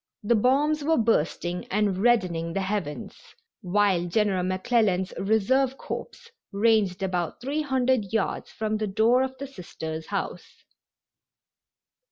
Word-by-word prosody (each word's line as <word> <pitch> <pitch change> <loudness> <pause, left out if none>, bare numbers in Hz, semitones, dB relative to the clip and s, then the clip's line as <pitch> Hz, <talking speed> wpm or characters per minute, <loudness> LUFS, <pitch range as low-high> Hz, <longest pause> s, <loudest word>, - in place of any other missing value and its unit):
The 210 - +3
bombs 280 +7 +2
were 320 +2 +2
bursting 180 -5 0
and 200 -2 0
reddening 185 -8 +1
the 195 - -1
heavens, 190 -6 -3 0.5
while 190 -2 +2
General 195 0 +1
McClellan's 185 0 +1
Reserve 250 +6 +2
Corps 470 - -7 0.2
ranged 200 -3 +2
about 180 -3 -2
three 280 +5 -2
hundred 260 -7 +1
yards 220 -3 -1
from 215 0 -2
the 215 0 -2
door 225 +5 +3
of 265 0 -2
the 275 - -5
Sisters' 160 - -7
house. - - -5
210 Hz, 125 wpm, -26 LUFS, 185-250 Hz, 0.5 s, The